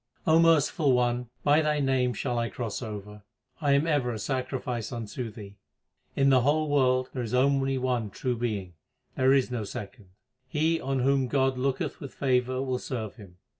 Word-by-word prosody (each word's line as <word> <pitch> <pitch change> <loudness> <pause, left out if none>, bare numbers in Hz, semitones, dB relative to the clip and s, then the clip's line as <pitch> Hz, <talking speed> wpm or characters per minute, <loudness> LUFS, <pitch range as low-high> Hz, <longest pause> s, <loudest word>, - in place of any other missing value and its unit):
O 160 +1 +5
Merciful 160 -3 +4
One, 125 -1 +1
by 145 +2 +4
Thy 150 -1 +1
name 130 -3 +1
shall 125 -3 -1
I 115 0 -1
cross 115 -2 -4
over; 105 -2 -7 0.4
I 145 -2 +3
am 140 +3 +3
ever 145 -7 +1
a 115 - -4
sacrifice 125 -1 -3
unto 115 0 -5
Thee. 105 -2 -11 0.6
In 135 0 +4
the 130 -1 +5
whole 155 +4 +2
world 130 -2 +2
there 130 - -3
is 120 0 -2
only 135 0 +2
one 125 -4 -1
True 125 +5 -2
Being; 105 -6 -3 0.4
there 130 0 +3
is 135 -2 +3
no 120 -3 -2
second. 105 +1 -8 0.4
He 160 +4 +1
on 135 -1 -1
whom 135 0 +2
God 135 0 +1
looketh 135 0 -1
with 140 - -9
favour 130 -1 +1
will 130 -2 -2
serve 115 -6 -5
Him. 95 -5 -14
130 Hz, 180 wpm, -27 LUFS, 120-140 Hz, 0.6 s, O